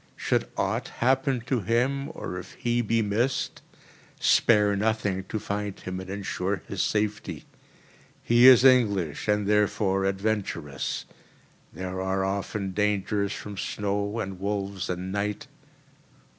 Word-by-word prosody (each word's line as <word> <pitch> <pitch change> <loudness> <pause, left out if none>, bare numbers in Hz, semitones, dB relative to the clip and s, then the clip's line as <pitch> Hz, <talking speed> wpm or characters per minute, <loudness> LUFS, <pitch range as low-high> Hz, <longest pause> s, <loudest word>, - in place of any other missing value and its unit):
Should - - 0
aught - - -1
happen 130 +1 +1
to 125 +2 -1
him, 125 +7 0
or 90 - -5
if 95 - -11
he 120 0 0
be 115 0 +1
missed, 115 +6 -1 0.6
spare 105 -3 +4
nothing 105 -2 0
to 110 - -3
find 105 -1 -4
him 95 0 -5
and 95 0 -8
ensure 95 -1 -3
his - - -2
safety. 105 0 -1 0.8
He 120 +2 +6
is 130 0 +8
English 100 - +3
and 105 0 +2
therefore 100 -2 +2
adventurous. 95 -8 -2 0.7
There 95 0 -5
are 95 0 0
often 100 0 -2
dangers 100 0 0
from 105 -1 -7
snow 100 +1 -2
and 95 -4 -4
wolves 100 -1 -3
and 90 +1 -3
night. 105 +1 -2
100 Hz, 130 wpm, -26 LUFS, 95-110 Hz, 0.8 s, is